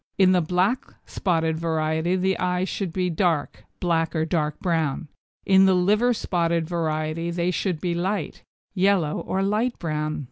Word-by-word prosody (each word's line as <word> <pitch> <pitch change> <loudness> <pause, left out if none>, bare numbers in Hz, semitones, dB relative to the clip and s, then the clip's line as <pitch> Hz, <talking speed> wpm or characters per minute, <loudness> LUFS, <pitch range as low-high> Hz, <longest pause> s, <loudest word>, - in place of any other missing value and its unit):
In 190 -1 +5
the 180 -1 +3
black 180 +9 0
spotted 160 -4 -1
variety 160 +1 0
the 190 +1 +1
eyes 180 +1 0
should 195 -4 -3
be 180 +1 -1
dark 165 -3 -1
(black 165 -2 0
or 160 0 +1
dark 150 -3 -1
brown), 160 -3 -1 0.4
in 190 0 +6
the 190 - +4
liver 210 +7 +3
spotted 170 -7 0
variety 160 -1 -2
they 170 +1 0
should 180 -2 -2
be 175 +1 -1
light 180 +1 -2 0.3
(yellow 185 -5 +2
or 190 +1 -2
light 215 +5 0
brown). 155 -2 -2
175 Hz, 155 wpm, -24 LUFS, 160-190 Hz, 0.4 s, in